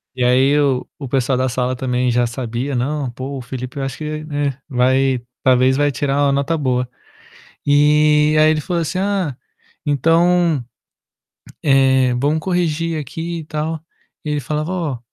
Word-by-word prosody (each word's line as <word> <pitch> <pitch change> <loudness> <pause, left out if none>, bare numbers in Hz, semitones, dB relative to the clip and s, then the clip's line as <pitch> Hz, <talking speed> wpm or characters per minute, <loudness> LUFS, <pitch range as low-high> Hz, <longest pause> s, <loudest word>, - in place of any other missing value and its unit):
E 125 - -1
aí 130 +4 +4
o 135 -3 +1
o 140 - -6
pessoal 130 0 +1
da 130 0 0
sala 125 +1 -1
também 125 0 -1
já 120 0 +2
sabia: 120 +3 -4
"Não, 135 +1 -2
pô, 130 +3 -6
o - - -6
Felipe 130 +1 -7
eu - - -2
acho 135 -1 -4
que, 155 0 -5
né, 145 -3 -2
vai 130 0 +2 0.2
talvez 130 0 +4
vai 145 0 +2
tirar 140 0 -1
uma 140 - +3
nota 140 +4 0
boa". 125 -3 -1 0.8
E 150 +1 +4
aí 155 0 +6
ele 155 - +1
falou 170 +1 -2
assim: 165 +3 -3
"Ah, 190 -7 -1 0.5
então, 165 +1 +3 1.0
eh, 130 -2 +4
vamos 145 +5 +1
corrigir 165 -2 -1
aqui 165 +4 -5
e - - -9
tal". 155 +1 -3 0.4
E 150 - -3
ele 150 -1 0
falava: 150 +5 -3
"Ó, 160 -9 -2
140 Hz, 165 wpm, -19 LUFS, 130-155 Hz, 1.0 s, aí